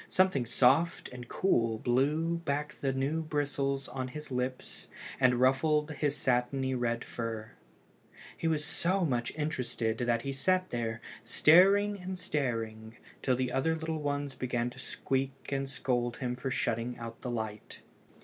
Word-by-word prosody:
Something 185 -10 +3
soft 135 +7 +3
and 125 -1 -9
cool 115 -12 +2
blew 150 +8 +1
back 150 -2 -2
the 135 - -1
new 135 +5 0
bristles 140 -3 -1
on 130 -1 -4
his 150 +2 -8
lips 125 0 -3 0.3
and 130 -2 +5
ruffled 150 +4 +3
his 145 0 -1
satiny 130 +1 +1
red 120 -2 0
fur. 115 -2 -5 0.8
He 165 - -2
was 155 -2 +1
so 180 +4 +1
much 125 -5 0
interested 125 -7 -1
that 120 -1 +1
he 135 - -2
sat 185 +6 +1
there, 115 -2 -2 0.2
staring 195 - +5
and 185 +1 -5
staring, 115 -8 -3 0.2
till 130 - +2
the 125 0 -1
other 150 +6 +1
little 160 -1 -3
ones 145 -1 -2
began 120 -2 -1
to - - -13
squeak 135 +1 -3
and 135 -1 -1
scold 120 -3 -1
him 125 -2 -2
for 125 +2 -4
shutting 120 -1 -1
out 115 -1 -8
the 125 - -4
light. 110 -3 -5
135 Hz, 150 wpm, -31 LUFS, 120-150 Hz, 0.8 s, and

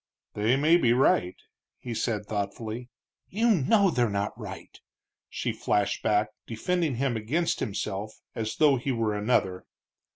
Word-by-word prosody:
"They 110 +4 +2
may 155 +5 +5
be 120 -8 +3
right," 105 -7 +3 0.4
he 120 - -6
said, 110 -2 -1
thoughtfully. 110 +4 -4 0.4
"You 230 +4 +2
know 195 - +4
they're 120 -6 +1
not 100 0 -1
right!" - - -9 0.5
she - - -2
flashed 100 -1 0
back, 105 0 +2 0.2
defending 160 +5 -1
him 130 0 0
against 145 +11 0
himself 105 -1 -3 0.2
as 110 -1 -3
though 145 -3 +4
he 130 +3 -2
were 115 -3 0
another. 105 -3 0
115 Hz, 140 wpm, -27 LUFS, 105-140 Hz, 0.5 s, may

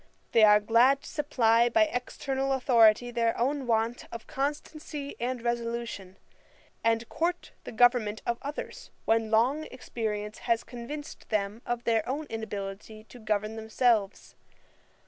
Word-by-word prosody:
They 225 - +5
are 210 -1 +7
glad 235 +6 +4
to - - -10
supply 240 -6 +2
by 330 +5 +4
external 270 -1 -2
authority 245 -3 +4
their 230 -1 0
own 270 +2 -1
want 230 +1 0
of 230 -1 -8
constancy 290 +1 -4
and 245 0 -3
resolution, 235 -5 -3 0.7
and 230 0 +1
court 350 +2 -2
the - - -6
government 235 -3 +3
of 235 0 -1
others, 290 +2 -7 0.2
when 225 -1 +2
long 250 +8 +2
experience 215 -4 -5
has 230 -1 +2
convinced 255 +5 -8
them 210 +1 -1
of 240 0 -2
their 225 -2 +2
own 295 +4 -2
inability 215 -1 -6
to 245 - -12
govern 215 0 -1
themselves. 220 -2 0
235 Hz, 135 wpm, -28 LUFS, 220-265 Hz, 0.7 s, are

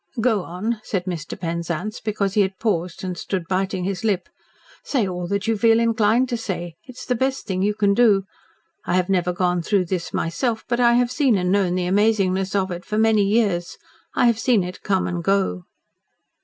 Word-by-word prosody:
"Go 225 -3 +2
on," 210 +6 -4
said 185 -3 -2
Mr. 170 -5 -5
Penzance, 170 +4 -3
because 200 -3 -2
he 210 - +3
had 190 -1 -1
paused 185 -4 -2
and 185 -1 -3
stood 180 -1 -4
biting 190 0 -1
his 195 +3 -3
lip. 200 -5 0 0.5
"Say 245 -8 0
all 180 -1 -4
that 200 +2 -1
you 225 - +1
feel 225 +1 +4
inclined 230 +1 +2
to 240 - -1
say. 175 -6 -4
It 255 -1 -12
is - - -8
the 250 - 0
best 265 +2 -1
thing 190 -3 -2
you 205 +2 +1
can 200 -1 +2
do. 205 -3 +4 0.6
I 175 - -1
have 185 0 +1
never 180 -2 +1
gone 180 -1 0
through 190 +1 +1
this 175 -1 -3
myself, 220 +8 -2
but 240 0 0
I 240 -1 +5
have 245 0 +2
seen 260 -6 +2
and 180 -1 0
known 190 -3 +2
the 180 -1 -1
amazingness 195 -1 +1
of 190 -1 0
it 175 +1 -5
for 215 - -3
many 220 -1 +4
years. 200 -4 0 0.4
I - - +3
have 235 -2 +3
seen 225 -4 +3
it 180 +1 -7
come 190 -2 0
and 175 -1 -3
go." 190 - 0
195 Hz, 210 wpm, -22 LUFS, 180-225 Hz, 0.6 s, I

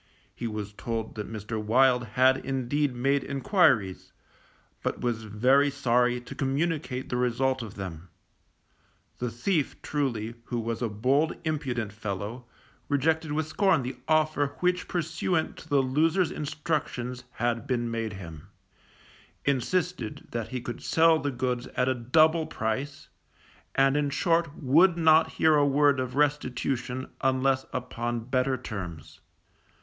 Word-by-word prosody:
He 120 - -4
was 105 -2 -5
told 115 +1 -4
that 105 0 -6
Mr. 110 0 -4
Wild 125 +3 +4
had 130 +1 +5
indeed 135 +1 -1
made 135 +3 +1
enquiries, 140 - +1 0.7
but - - -3
was 115 -3 -1
very 130 +7 +3
sorry 125 -3 +2
to 120 - -9
communicate 140 -1 -2
the 125 - -1
result 125 +2 +1
of 110 -4 -8
them; 90 -3 -7 1.1
the 125 - -1
thief, 145 - -1
truly, 120 -7 -2
who 120 - -3
was 115 +1 -3
a 120 - 0
bold 130 +9 +1
impudent 130 -9 -2
fellow, 105 +3 -5 0.4
rejected 155 +2 +1
with 155 +1 0
scorn 165 -1 +2
the 130 +1 -4
offer 155 -2 +2
which 180 0 +1
pursuant 170 0 -1
to 160 - -12
the 140 -2 +3
loser's 160 +7 +2
instructions 140 -5 -3
had 120 -1 -1
been 120 -2 -1
made 115 -2 -2
him, 80 -6 -9 1.0
insisted 140 -1 -1
that 115 -2 -3
he 130 -1 -4
could 120 0 -6
sell 160 0 +4
the 145 - -1
goods 125 -1 -2
at 125 - +2
a 130 - +3
double 155 +7 +3
price, 135 +7 -3 0.7
and 135 0 +4
in 145 -1 +1
short 165 +2 +1
would 165 +6 +4
not 160 -1 +5
hear 160 -1 +4
a 145 -1 +4
word 140 -1 +3
of 130 0 -3
restitution 130 -3 -1 0.2
unless 130 0 +2
upon 120 -1 -3
better 130 +2 0
terms. 95 -10 -7
130 Hz, 140 wpm, -27 LUFS, 120-150 Hz, 1.1 s, had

